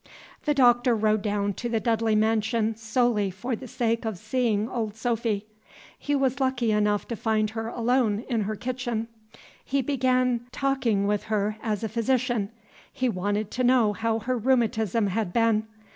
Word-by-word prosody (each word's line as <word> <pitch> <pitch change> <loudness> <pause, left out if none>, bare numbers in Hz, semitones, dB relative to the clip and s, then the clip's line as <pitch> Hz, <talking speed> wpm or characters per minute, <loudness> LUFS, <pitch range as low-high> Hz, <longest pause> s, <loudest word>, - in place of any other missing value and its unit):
The 295 -1 +2
Doctor 245 -2 +4
rode 215 -1 +2
down 205 -1 -1
to 240 +4 -4
the 230 -1 +1
Dudley 225 -1 +1
mansion 220 +1 +1
solely 220 -2 +1
for 235 +7 -3
the 255 +3 -9
sake 230 0 -1
of 220 -4 -3
seeing 220 0 0
old 225 -4 -3
Sophy. 225 -3 -1 0.5
He 290 - -2
was 270 -1 +1
lucky 260 -4 +1
enough 210 -1 +1
to 235 - -2
find 220 -1 0
her 225 0 -4
alone 235 -2 +1
in 235 -4 0
her 215 +1 -2
kitchen. 240 -1 -3 0.5
He 275 0 0
began 255 -2 +1
taking 260 -8 0
with 205 0 0
her 210 0 -1
as 215 -1 -2
a - - 0
physician; 235 -2 0 0.4
he 255 -1 -1
wanted 205 +1 -2
to 255 - -1
know 245 -4 +4
how 225 +1 0
her 245 +2 -2
rheumatism 225 -3 +1
had 200 -1 -1
been. 225 -2 +2
225 Hz, 165 wpm, -26 LUFS, 215-245 Hz, 0.5 s, Doctor